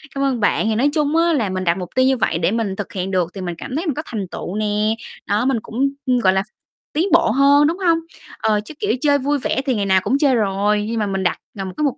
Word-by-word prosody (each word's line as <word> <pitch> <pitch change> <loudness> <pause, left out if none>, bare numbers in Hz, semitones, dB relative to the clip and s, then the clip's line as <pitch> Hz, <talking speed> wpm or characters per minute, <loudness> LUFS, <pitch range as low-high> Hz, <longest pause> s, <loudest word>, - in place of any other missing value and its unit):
Cảm 275 - -1
ơn 260 -4 0
bạn. 210 - +1
Thì 220 - +1
nói 270 +6 +3
chung 300 0 +1
á, 335 0 +3
là 225 -9 0
mình 185 0 -3
đặt 170 +1 +1
mục 180 -2 -5
tiêu 260 0 +4
như 265 -1 +3
vậy 180 - 0
để 165 +3 +1
mình 220 -4 -1
thực 205 0 -6
hiện 190 0 -3
được 180 -3 +1
thì 195 - -7
mình 175 -2 -4
cảm 255 - -6
thấy 330 +5 -2
mình 305 - 0
có 310 - -2
thành 205 -5 -4
tựu 185 - -5
nè. 215 +1 0 0.3
Đó, 210 +5 +1
mình 260 -4 +1
cũng, 265 +5 0 0.3
gọi 185 0 +5
là, 190 0 +1 0.5
tiến 330 +6 +1
bộ 220 - +5
hơn, 280 +3 +5
đúng 335 +3 -1
hông? 335 -4 +2 0.4
Ờ, 210 -1 +1
chứ, 310 - -9
kiểu, 415 - 0
chơi 285 -2 +4
vui 285 +2 0
vẻ 265 - -1
thì 260 - +1
ngày 205 -2 -1
nào 190 -1 +3
cũng 255 +7 +1
chơi 275 -3 +3
rồi, 205 0 +1
nhưng 230 0 -2
mà 210 - 0
mình 195 -1 -2
đặt, 180 - +1 0.2
ờ, 195 - -3
một 185 - -6
cái 300 - -1
mục 280 - 0
220 Hz, 290 wpm, -20 LUFS, 195-280 Hz, 0.5 s, gọi